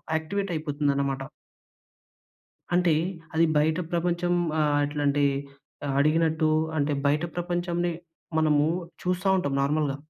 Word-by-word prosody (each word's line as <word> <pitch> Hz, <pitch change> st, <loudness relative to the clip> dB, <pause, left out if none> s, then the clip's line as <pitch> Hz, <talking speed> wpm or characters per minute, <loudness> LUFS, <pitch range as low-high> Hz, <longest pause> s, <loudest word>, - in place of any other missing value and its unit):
యాక్టివేటయిపోతుందనమాట. 150 Hz, -6 st, -1 dB, 1.5 s
అంటే, 175 Hz, -3 st, +4 dB, 0.4 s
అది 165 Hz, +1 st, +4 dB
బయట 155 Hz, +3 st, +2 dB
ప్రపంచం 175 Hz, +1 st, 0 dB, 0.3 s
ఆహ్, 145 Hz, -1 st, +2 dB
అట్లాంటి 145 Hz, 0 st, +1 dB, 0.6 s
ఆహ్, 135 Hz, -, -1 dB
అడిగినట్టు. 160 Hz, +1 st, +2 dB, 0.3 s
అంటే, 145 Hz, +1 st, +1 dB
బయట 150 Hz, +3 st, +2 dB
ప్రపంచంని 175 Hz, 0 st, -1 dB, 0.5 s
మనము 150 Hz, -1 st, +3 dB, 0.4 s
చూస్తా 180 Hz, +2 st, 0 dB
ఉంటాం 140 Hz, -6 st, -1 dB
నార్మల్‌గా. 145 Hz, -1 st, 0 dB
155 Hz, 95 wpm, -26 LUFS, 145-175 Hz, 1.5 s, అంటే